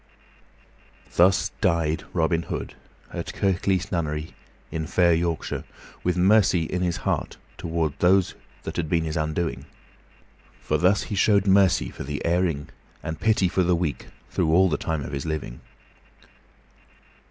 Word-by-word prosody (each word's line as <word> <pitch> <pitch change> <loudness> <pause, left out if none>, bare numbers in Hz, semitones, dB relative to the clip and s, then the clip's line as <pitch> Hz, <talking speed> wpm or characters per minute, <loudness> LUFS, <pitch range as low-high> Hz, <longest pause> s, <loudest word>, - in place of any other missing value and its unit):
Thus 95 +1 +4
died 85 -5 +1
Robin 85 -1 +1
Hood, - - -5 0.4
at - - -5
Kirklees 95 -1 0
Nunnery, 80 -2 -2 0.4
in 80 -1 -3
fair 85 -2 +3
Yorkshire, 85 0 -1 0.4
with 90 0 0
mercy 95 -2 +4
in 90 +3 -3
his 90 -2 0
heart - - -1 0.2
toward 80 -3 -2
those 95 +1 +3 0.3
that - - -6
had 80 -3 -1
been 85 0 +2
his 80 -1 -3
undoing; 80 +1 -2 0.9
for 75 - -1
thus 95 +5 +3
he 105 - -4
showed 100 0 +3
mercy 95 -2 +4
for - - -7
the 75 +2 -4
erring 85 -4 0 0.3
and 80 -1 -4
pity 110 -2 +3
for 95 - +1
the 90 0 +3
weak 85 -4 -3 0.2
through 80 - +1
all 95 +3 +5
the 75 - +1
time 80 -2 -2
of - - -6
his 70 +3 -4
living. 75 -6 -4
85 Hz, 145 wpm, -25 LUFS, 80-95 Hz, 0.9 s, all